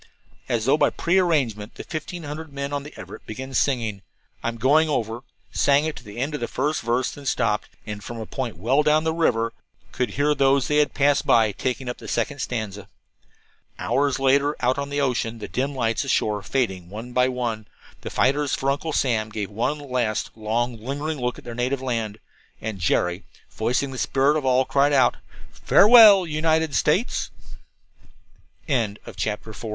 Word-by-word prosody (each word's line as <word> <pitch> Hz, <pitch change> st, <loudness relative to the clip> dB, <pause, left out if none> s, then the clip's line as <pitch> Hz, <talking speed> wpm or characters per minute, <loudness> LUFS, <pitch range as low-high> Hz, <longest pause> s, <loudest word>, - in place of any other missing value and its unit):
As 115 Hz, -2 st, 0 dB
though 135 Hz, +3 st, +4 dB
by -, -, +4 dB
prearrangement 150 Hz, -, 0 dB
the -, -, -7 dB
fifteen 170 Hz, +2 st, -6 dB
hundred 155 Hz, +1 st, -7 dB
men 140 Hz, +1 st, -4 dB
on 145 Hz, -, -1 dB
the 150 Hz, +2 st, -10 dB
Everett -, -, -10 dB
began 130 Hz, +5 st, -7 dB
singing, 115 Hz, -8 st, 0 dB, 0.4 s
"I'm 115 Hz, 0 st, -3 dB
Going 150 Hz, +6 st, +3 dB
Over," 115 Hz, -4 st, -2 dB, 0.3 s
sang 140 Hz, +1 st, +3 dB
it 160 Hz, -, -3 dB
to -, -, -10 dB
the 105 Hz, 0 st, -11 dB
end 135 Hz, +5 st, -2 dB
of 150 Hz, -, -3 dB
the 120 Hz, -, -2 dB
first 150 Hz, +4 st, -1 dB
verse, 120 Hz, +2 st, 0 dB
then 145 Hz, -1 st, -10 dB
stopped, 115 Hz, -4 st, 0 dB, 0.2 s
and 105 Hz, -2 st, -6 dB
from 120 Hz, +2 st, -7 dB
a 110 Hz, -, -5 dB
point 120 Hz, -5 st, -5 dB
well 125 Hz, -, +2 dB
down 150 Hz, +1 st, +3 dB
the 160 Hz, 0 st, 0 dB
river 115 Hz, -9 st, +1 dB, 0.4 s
could 125 Hz, -3 st, -1 dB
hear 145 Hz, +1 st, +3 dB
those 135 Hz, -1 st, +3 dB
they 150 Hz, -, +1 dB
had 150 Hz, -1 st, +2 dB
passed 140 Hz, 0 st, +2 dB, 0.3 s
taking 130 Hz, 0 st, -2 dB
up 125 Hz, -, -4 dB
the -, -, -10 dB
second 140 Hz, +5 st, -2 dB
stanza. 105 Hz, -5 st, -4 dB, 0.9 s
Hours 140 Hz, 0 st, +1 dB
later, 140 Hz, +2 st, +2 dB
out 125 Hz, 0 st, +2 dB
upon 140 Hz, 0 st, -3 dB
the 145 Hz, 0 st, -2 dB
ocean, 120 Hz, -4 st, -1 dB
the 110 Hz, -, -7 dB
dim 135 Hz, +2 st, -2 dB
lights 115 Hz, -1 st, 0 dB
ashore 105 Hz, -6 st, 0 dB
fading 95 Hz, -8 st, -2 dB
one 115 Hz, +5 st, -8 dB
by 125 Hz, 0 st, +3 dB
one, 120 Hz, -4 st, -3 dB, 0.3 s
the -, -, -6 dB
fighters 140 Hz, +1 st, +1 dB
for 135 Hz, +1 st, 0 dB
Uncle 150 Hz, +3 st, -3 dB
Sam 115 Hz, -6 st, +1 dB
gave 105 Hz, -2 st, -5 dB
one 125 Hz, +8 st, -1 dB
last, 125 Hz, -6 st, -2 dB
long, 115 Hz, +1 st, -2 dB
lingering 145 Hz, +4 st, -3 dB
look 125 Hz, 0 st, -1 dB
at -, -, -12 dB
their 120 Hz, -, -7 dB
native 125 Hz, +3 st, -1 dB
land. 115 Hz, -5 st, -3 dB, 0.4 s
And 110 Hz, -3 st, -5 dB
Jerry, 90 Hz, +2 st, 0 dB, 0.3 s
voicing 125 Hz, +5 st, -1 dB
the 130 Hz, -, -6 dB
spirit 140 Hz, +2 st, +2 dB
of 150 Hz, -3 st, -1 dB
all, 130 Hz, 0 st, +3 dB
cried 140 Hz, +2 st, +2 dB
out: 130 Hz, -3 st, +4 dB, 0.3 s
"Farewell, 210 Hz, -3 st, +7 dB
United 160 Hz, -1 st, +1 dB
States." 120 Hz, -, +1 dB, 1.4 s
CHAPTER 115 Hz, -7 st, 0 dB
V -, -, -28 dB
THE 110 Hz, 0 st, -4 dB
FIGHT -, -, -11 dB
I 110 Hz, -, -4 dB
130 Hz, 185 wpm, -23 LUFS, 115-145 Hz, 1.4 s, Farewell